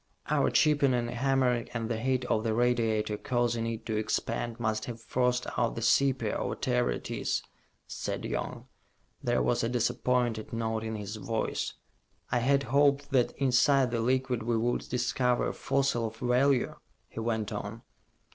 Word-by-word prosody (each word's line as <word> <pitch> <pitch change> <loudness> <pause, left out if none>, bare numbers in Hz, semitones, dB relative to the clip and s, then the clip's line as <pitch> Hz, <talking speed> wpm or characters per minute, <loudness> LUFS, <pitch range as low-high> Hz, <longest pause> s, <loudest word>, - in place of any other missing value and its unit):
"Our - - +3
chipping 145 -4 +3
and 120 -1 -1
hammering 125 -1 +1
and 115 -1 -1
the 115 -1 -2
heat 130 +1 0
of 110 -3 +1
the 110 -2 0
radiator 115 -3 +1
causing 120 -1 0
it 115 0 -4
to 110 -2 -1
expand 115 +2 -2
must 110 -1 -1
have 120 -2 -6
forced 125 +2 0
out 120 -2 +1
the 115 - -4
sepia, 135 +3 +2
or - - -2
whatever - - 0
it - - -4
is," - - -1 0.4
said - - -4
Young. - - -4 0.6
There 65 - +1
was 60 - +1
a 115 - +1
disappointed 120 -1 0
note 110 -1 -1
in 110 0 -3
his 105 0 -5
voice 110 +2 -2 0.6
"I 125 - +2
had 140 +3 +2
hoped 140 +2 +2
that 125 -3 +2
inside 130 0 +3
the 115 -1 0
liquid 130 0 +1
we 115 +1 0
would 120 +2 -1
discover 125 0 +1
a - - -4
fossil 135 -4 0
of 110 +1 -9
value," 125 +2 +2 0.3
he - - -8
went 110 -2 -1
on. 105 +2 -5
120 Hz, 165 wpm, -29 LUFS, 110-125 Hz, 0.6 s, Our